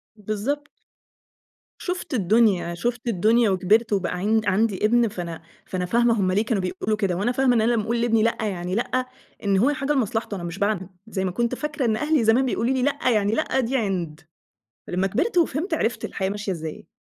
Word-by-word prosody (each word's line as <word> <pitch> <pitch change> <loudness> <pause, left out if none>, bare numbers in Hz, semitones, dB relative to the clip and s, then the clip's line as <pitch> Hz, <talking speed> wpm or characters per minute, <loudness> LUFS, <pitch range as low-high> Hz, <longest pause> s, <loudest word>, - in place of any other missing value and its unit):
بالضبط. 215 +8 -3 1.1
شُفت 360 -4 -4
الدنيا، 200 -4 +2
شُفت 240 +6 -3
الدنيا 225 +2 +3
وكبرت 205 +4 +2
وبقى 190 -3 0
عِن 215 +4 +2
عندي 205 +1 +1
ابن 235 +2 +4
فأنا 170 -5 -6 0.2
فأنا 180 -1 -3
فاهمة 230 +3 +2
هُم 185 -1 +2
ليه 210 +4 +1
كانوا 215 -4 0
بيقُولوا 195 +3 -2
كده 195 -4 0
وأنا 205 +7 0
فاهمة 250 0 +2
إن 225 - +3
أنا 230 - +2
لمّا 220 - +1
أقُول 235 +2 -1
لابني 225 -2 +2
لأ 230 - +1
يعني 185 -3 -2
لأ 255 +2 0 0.4
إن 200 -1 +2
هو 245 +8 +4
لحاجة 290 0 0
لمصلحته 225 -4 -1
أنا 175 - -6
مش 170 +2 -6
باعنِد 200 -3 0 0.2
زي 190 -3 -2
ما 185 - -1
كنت 235 +6 -1
فاكرة 295 -1 -3
إن 220 -2 +2
أهلي 300 -3 +1
زمان 230 +4 +4
بيقولوا 250 0 0
لي 260 - 0
لأ 280 -2 +1
يعني 210 -3 +2
لأ 265 - 0
دي 260 +2 0
عِند 175 -7 -2 0.7
لمّا 185 +2 0
كبرت 360 - -1
وفهمت 325 +1 +1
عرفت 235 -7 -1
الحياة 190 0 -2
ماشية 205 0 -3
إزاي. 160 -2 -6
220 Hz, 200 wpm, -24 LUFS, 190-245 Hz, 1.1 s, ابن